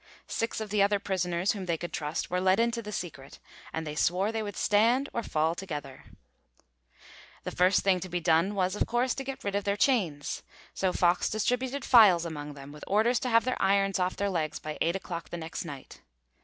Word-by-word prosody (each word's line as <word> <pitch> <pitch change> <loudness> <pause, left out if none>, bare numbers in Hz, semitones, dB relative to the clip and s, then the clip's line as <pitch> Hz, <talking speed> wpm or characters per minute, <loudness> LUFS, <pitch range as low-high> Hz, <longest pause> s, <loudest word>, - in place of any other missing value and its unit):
Six 230 0 -2
of 215 -2 -5
the 210 -1 +2
other 205 +1 +4
prisoners 185 -2 -1
whom 195 -3 -5
they 170 -1 0
could 175 +2 -7
trust 150 +2 -3
were 180 0 0
let 190 +2 +3
into 235 0 +1
the 210 -1 -7
secret, 160 -8 -6 0.3
and 160 0 -4
they 150 - -4
swore 180 +7 +1
they 225 -1 -2
would 205 -2 -5
stand 235 +6 +3
or 235 - -1
fall 160 -5 0
together. 150 -7 -7 1.4
The - - -4
first 185 +2 +3
thing 190 -2 +2
to 185 - -7
be 175 0 -1
done 170 +4 +2
was, 185 0 0
of - - 0
course, 245 +1 +1
to 270 - -5
get 270 0 -6
rid 200 - -2
of 200 0 0
their 200 +1 0
chains, 180 - 0 0.3
so 190 -1 0
Fox 175 0 +2
distributed 250 +5 -1
files 200 -9 +7
among 150 -3 -6
them, 140 0 -10
with 150 0 -11
orders 220 +4 +3
to 255 - -2
have 230 0 +4
their 255 - -1
irons 195 0 +2
off 180 0 0
their 200 0 -1
legs 160 -4 -1
by 155 0 -6
eight 170 +2 +2
o'clock 170 -3 -5
the 175 - -5
next 165 +2 -5
night. 140 -4 -10
190 Hz, 215 wpm, -29 LUFS, 165-215 Hz, 1.4 s, files